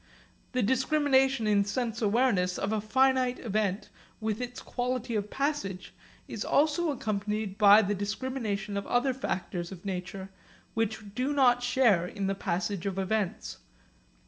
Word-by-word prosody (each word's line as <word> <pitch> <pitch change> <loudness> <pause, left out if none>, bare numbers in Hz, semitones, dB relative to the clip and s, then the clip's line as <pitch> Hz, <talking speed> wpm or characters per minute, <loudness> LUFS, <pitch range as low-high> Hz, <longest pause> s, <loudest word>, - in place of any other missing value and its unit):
The 250 -1 +1
discrimination 265 0 +2
in 205 -1 +3
sense 235 +3 -3
awareness 205 -5 +2
of 200 - -2
a 215 -1 0
finite 255 +2 +2
event 210 -3 -2 0.3
with 220 +1 -2
its 245 0 -5
quality 245 -2 -3
of 210 0 -2
passage 265 -11 -3 0.3
is - - -4
also 310 +3 +2
accompanied 210 -5 -2
by 210 +1 +8
the 205 +1 0
discrimination 210 0 -3
of 200 - -4
other 255 +2 +2
factors 180 -8 -4
of 185 0 -10
nature 190 0 -5 0.4
which 220 -2 -2
do 255 +5 -1
not 250 -3 +4
share 245 -8 +3
in 195 +2 -4
the 195 - +1
passage 190 0 -2
of 195 -1 -3
events. 195 0 -2
215 Hz, 145 wpm, -29 LUFS, 200-255 Hz, 0.4 s, by